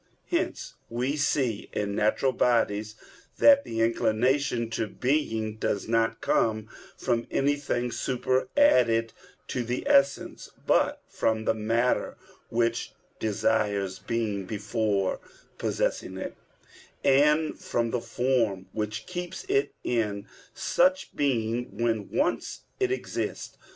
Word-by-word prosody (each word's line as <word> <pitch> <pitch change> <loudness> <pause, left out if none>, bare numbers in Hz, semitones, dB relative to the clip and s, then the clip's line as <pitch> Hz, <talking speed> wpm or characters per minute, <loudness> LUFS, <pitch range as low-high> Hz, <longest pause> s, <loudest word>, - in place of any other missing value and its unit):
Hence - - -1 0.2
we 125 +5 -1
see 135 -7 0
in 100 -1 -1
natural 110 +6 +2
bodies 110 -4 +1 0.4
that 280 -1 +7
the 115 0 -3
inclination 115 +2 +1
to 115 -1 -1
being 115 -5 -1
does 100 -2 -1
not 115 0 +1
come 110 -1 +1 0.3
from 120 -2 -1
anything 140 -3 0
superadded 125 - +2 0.4
to 125 - -1
the 120 +2 -3
essence, 140 0 +2 0.2
but - - +2
from 110 0 0
the - - +3
matter 115 +3 0 0.3
which 115 0 0 0.3
desires 100 -2 0
being 110 -4 -2
before 105 -2 -1 0.4
possessing 95 - -1
it, - - -5 0.7
and 150 +3 +3
from 115 -1 -1
the 125 - -1
form 115 -5 0
which 105 0 -3
keeps 180 0 -5
it 415 +1 +1
in 105 -4 -1 0.3
such 265 +9 +1
being 120 -5 -1
when 115 -3 0
once 120 - -1 0.2
it 385 -1 +1
exists. 390 - -3
115 Hz, 110 wpm, -27 LUFS, 110-135 Hz, 0.7 s, that